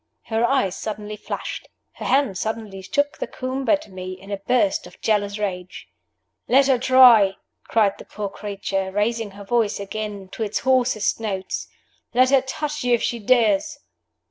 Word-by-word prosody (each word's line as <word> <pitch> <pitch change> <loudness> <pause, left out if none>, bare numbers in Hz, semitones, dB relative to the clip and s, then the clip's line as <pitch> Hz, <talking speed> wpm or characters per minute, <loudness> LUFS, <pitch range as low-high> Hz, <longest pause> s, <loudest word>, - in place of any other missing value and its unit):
Her 225 0 -1
eyes 235 -7 +2
suddenly 210 0 -5
flashed, - - -6 0.3
her - - -6
hand 265 -5 +2
suddenly 215 -1 -4
shook 285 +8 -1
the - - -3
comb 260 +1 -4
at 305 0 +2
me, 185 -1 -7
in 195 +2 -12
a 200 - -1
burst 200 -2 +1
of 180 - -17
jealous 205 -1 0
rage. 185 -3 -5 0.6
"Let 270 +2 +5
her 265 -2 +3
try!" 245 -6 +7 0.3
cried 210 -3 +2
the - - -10
poor 210 -1 -5
creature, 195 -1 -4
raising 215 +2 0
her 200 - -8
voice 220 0 0
again 200 -1 -5
to 225 - -9
its 215 -1 -1
hoarsest 255 -6 +2
notes. 195 -4 -3 0.5
"Let 255 +1 +5
her 270 -1 +5
touch 300 +2 -4
you 245 -1 +4
if 235 - -4
she 235 - -1
dares!" 255 +7 +2
220 Hz, 170 wpm, -22 LUFS, 200-255 Hz, 0.6 s, try